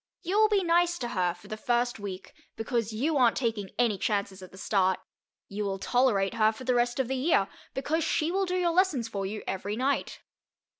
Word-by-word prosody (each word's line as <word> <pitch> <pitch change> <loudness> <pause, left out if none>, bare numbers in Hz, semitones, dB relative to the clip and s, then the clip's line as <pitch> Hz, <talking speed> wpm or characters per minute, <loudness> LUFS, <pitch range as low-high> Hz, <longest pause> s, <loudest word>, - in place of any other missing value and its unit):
You 375 +4 +1
will 435 0 +5
be 405 -2 +2
nice 345 0 +2
to 240 -5 -4
her 180 -5 0
for 180 +3 -16
the 215 - -5
first 240 +2 0
week, 190 -2 -7 0.2
because 225 0 -2
you 285 +8 0
aren't 245 -3 +4
taking 225 -6 -1
any 230 -5 +2
chances 200 -2 -1
at 185 - -11
the 190 - -14
start; 190 -1 +1 0.5
you 210 +1 -4
will 195 -1 -2
tolerate 215 -3 +2
her 220 -1 +3
for 220 +4 -10
the 255 0 +1
rest 240 +1 +1
of 265 - +1
the 265 - -1
year, 255 - +2 0.3
because 315 +4 0
she 320 +1 0
will 385 +1 0
do 360 - -1
your 355 -2 +2
lessons 330 -10 +2
for 200 -3 -3
you 210 +2 -6
every 200 +2 -3
night. 265 +4 -1
235 Hz, 215 wpm, -28 LUFS, 200-295 Hz, 0.5 s, will